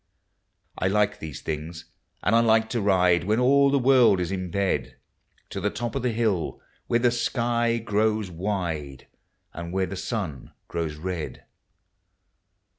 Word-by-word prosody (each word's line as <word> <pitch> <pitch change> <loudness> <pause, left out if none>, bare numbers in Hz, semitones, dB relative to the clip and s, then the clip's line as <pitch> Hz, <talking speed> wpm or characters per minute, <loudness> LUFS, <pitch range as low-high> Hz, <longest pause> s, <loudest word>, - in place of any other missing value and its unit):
I 95 - +1
like 105 +1 +1
these 75 -4 -7
tilings, 80 +2 -5 0.4
and 100 +5 +3
I - - +6
like 110 -1 +3
to 120 - 0
ride, 90 -3 +3
When 110 +3 +2
all 140 +2 +5
the 140 - +3
world 125 -6 +5
is 90 0 -2
in 95 -2 -3
bed. 90 -8 -1 0.6
To - - -4
the - - +1
to]) 115 +3 -4
of 135 - -2
the 125 - +1
hill 110 -7 -1 0.3
where 115 - +3
the 120 0 +3
sky 120 -1 0
grOWfl 105 -2 +1
wide, 80 -7 -3 0.5
And 85 0 -6
where 95 +1 +1
the 95 - -6
sun 95 - -4
grows 80 -3 -3
red. 85 0 -5
100 Hz, 155 wpm, -25 LUFS, 85-115 Hz, 0.6 s, I